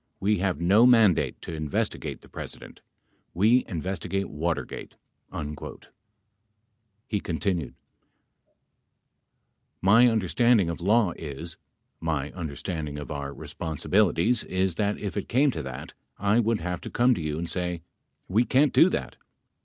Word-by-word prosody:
We 105 Hz, 0 st, +1 dB
have 90 Hz, -4 st, 0 dB
no 100 Hz, +8 st, +5 dB
mandate 115 Hz, -7 st, +4 dB
to -, -, -6 dB
investigate 75 Hz, -2 st, -3 dB
the -, -, -17 dB
Presi -, -, -7 dB
dent. -, -, -13 dB, 0.5 s
We 110 Hz, +8 st, +4 dB
investigate 95 Hz, +2 st, -3 dB
Watergate." 80 Hz, +3 st, -3 dB, 0.4 s
38 75 Hz, 0 st, -7 dB, 1.2 s
He 105 Hz, -, -1 dB
continued: 85 Hz, -4 st, -2 dB, 2.0 s
My 115 Hz, +6 st, +6 dB
understanding 110 Hz, -2 st, +3 dB
of 85 Hz, -, -7 dB
law 105 Hz, +1 st, +3 dB
is 80 Hz, +2 st, -6 dB, 0.2 s
— -, -, -50 dB
my 75 Hz, -1 st, -2 dB
understanding 80 Hz, -2 st, -5 dB
of 75 Hz, +1 st, -7 dB
our 70 Hz, -1 st, -4 dB
responsibilities, 95 Hz, -, 0 dB
is 95 Hz, 0 st, 0 dB
that 105 Hz, +4 st, 0 dB
if 100 Hz, -2 st, -5 dB
it 100 Hz, -, -4 dB
came 135 Hz, +4 st, +3 dB
to 80 Hz, -, -4 dB
that 65 Hz, -3 st, -7 dB, 0.2 s
I 100 Hz, +3 st, +2 dB
would 115 Hz, -3 st, +1 dB
have 90 Hz, 0 st, -3 dB
to -, -, -7 dB
come 125 Hz, +1 st, +3 dB
to 100 Hz, -, -3 dB
you 75 Hz, -1 st, -2 dB
and 85 Hz, +1 st, -3 dB
say, 90 Hz, -1 st, -3 dB, 0.4 s
"We 110 Hz, +6 st, +3 dB
can't 135 Hz, +3 st, +3 dB
do -, -, +6 dB
that." -, -, -4 dB
90 Hz, 140 wpm, -26 LUFS, 80-105 Hz, 2.0 s, My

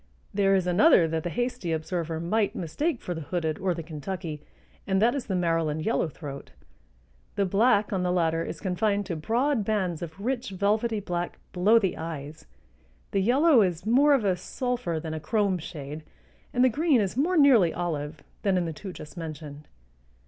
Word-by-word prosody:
There 195 Hz, -1 st, +3 dB
is 185 Hz, -2 st, +1 dB
another 180 Hz, -, +5 dB
that 160 Hz, 0 st, -1 dB
the 175 Hz, -, -3 dB
hasty 245 Hz, -4 st, -2 dB
observer 160 Hz, 0 st, -2 dB
might 205 Hz, +6 st, 0 dB
mistake 240 Hz, -, -2 dB
for 180 Hz, -, -4 dB
the 165 Hz, -, -6 dB
hooded 160 Hz, 0 st, -2 dB
or 185 Hz, -2 st, 0 dB
the 165 Hz, -, -5 dB
Kentucky, 155 Hz, 0 st, -6 dB, 0.5 s
and 190 Hz, -1 st, +2 dB
that 230 Hz, +4 st, +4 dB
is 280 Hz, -3 st, -4 dB
the 190 Hz, -, -1 dB
Maryland 165 Hz, -3 st, 0 dB
yellowthroat. 150 Hz, -9 st, -3 dB, 0.9 s
The 200 Hz, -, +1 dB
black 205 Hz, +2 st, +3 dB
on 190 Hz, -, 0 dB
the 180 Hz, 0 st, 0 dB
latter 165 Hz, -2 st, +1 dB
is -, -, -6 dB
confined 200 Hz, +2 st, 0 dB
to 180 Hz, -, -3 dB
broad 235 Hz, -, 0 dB
bands 190 Hz, -6 st, -1 dB
of 170 Hz, +1 st, -7 dB
rich 250 Hz, +2 st, -2 dB
velvety 210 Hz, +3 st, 0 dB
black 175 Hz, -2 st, -3 dB, 0.2 s
below 200 Hz, +6 st, +5 dB
the 195 Hz, -5 st, +1 dB
eyes; 160 Hz, -1 st, -7 dB, 0.6 s
the 195 Hz, -, +1 dB
yellow 265 Hz, -, +5 dB
is 180 Hz, -2 st, 0 dB
more 280 Hz, +6 st, +5 dB
of 240 Hz, -6 st, 0 dB
a 190 Hz, -2 st, +3 dB
sulphur 210 Hz, -, -3 dB
than 160 Hz, 0 st, -5 dB
a 160 Hz, -, -3 dB
chrome 195 Hz, +3 st, 0 dB
shade, 150 Hz, -2 st, -7 dB, 0.5 s
and 250 Hz, -, +2 dB
the 255 Hz, -, +6 dB
green 295 Hz, +1 st, +2 dB
is 200 Hz, -2 st, -1 dB
more 335 Hz, +8 st, +1 dB
nearly 250 Hz, -, +6 dB
olive 155 Hz, -3 st, -4 dB, 0.2 s
than 195 Hz, -2 st, +2 dB
in 175 Hz, -, 0 dB
the 165 Hz, -, -3 dB
two 190 Hz, +5 st, -8 dB
just 155 Hz, -2 st, -11 dB
mentioned. 150 Hz, -3 st, -8 dB
185 Hz, 185 wpm, -27 LUFS, 165-220 Hz, 0.9 s, the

